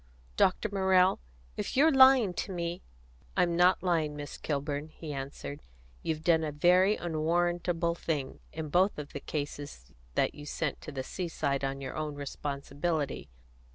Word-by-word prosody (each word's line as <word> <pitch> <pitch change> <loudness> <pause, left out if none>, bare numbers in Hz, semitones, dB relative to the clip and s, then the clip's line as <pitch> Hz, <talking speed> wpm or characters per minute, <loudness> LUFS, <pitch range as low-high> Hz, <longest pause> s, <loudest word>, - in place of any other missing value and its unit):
"Dr. 185 - +3
Morrell, 190 -1 +4 0.4
if - - -3
you 285 - +7
are 320 - +6
lying 260 -7 +7
to 190 - -4
me 170 -1 -3 0.3
" - - -23
"I'm 170 -1 +3
not 180 +2 +4
lying, 160 -5 +1
Miss 145 0 -6
Kilburn," 145 0 -2
he 155 -1 -8
answered. 140 +1 -6 0.4
"You've 160 -1 -2
done 160 -1 +4
a 155 - -2
very 180 +7 +4
unwarrantable 170 +1 0
thing 150 -5 -3
in 155 -1 -5
both 185 +6 +3
of 150 -1 -7
the - - -4
cases 145 - -6 0.2
that - - +2
you 145 0 -10
sent 150 -1 -2
to - - -7
the 135 -2 -4
seaside 150 -5 -2
on 135 0 -2
your 130 -1 -5
own 155 -1 -3
responsibility. 145 +1 -3
160 Hz, 160 wpm, -30 LUFS, 145-175 Hz, 0.4 s, you